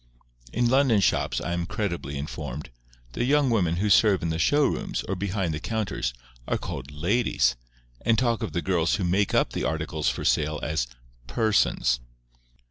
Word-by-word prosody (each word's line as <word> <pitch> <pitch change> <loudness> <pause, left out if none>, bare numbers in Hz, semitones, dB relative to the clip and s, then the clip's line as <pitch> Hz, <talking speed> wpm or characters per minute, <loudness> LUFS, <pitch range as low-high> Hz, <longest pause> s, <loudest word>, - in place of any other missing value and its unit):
In 120 +1 +1
London 130 -3 +4
shops, 100 - +1
I 85 - -3
am 85 0 -2
credibly 85 -9 -3
informed, 75 -1 -6 0.4
the - - -1
young 140 0 +3
women 90 -7 +2
who 100 +5 0
serve 100 -3 +5
in 85 - 0
the 80 - -2
show 145 - +4
rooms, - - -2
or 95 - -1
behind 95 -2 -2
the 75 - -3
counters, 105 - -2 0.4
are - - +1
called 70 - -6
LADIES, 80 - +1 0.5
and 115 -1 +3
talk 115 -2 +1
of - - -3
the 85 - -2
girls 85 -3 +2
who 100 - -2
make 95 +3 +1
up - - +2
the - - -2
articles 80 +1 -1
for - - -4
sale 75 0 +1
as 80 -5 -1 0.4
PERSONS. 105 - +2
90 Hz, 175 wpm, -26 LUFS, 80-110 Hz, 0.5 s, serve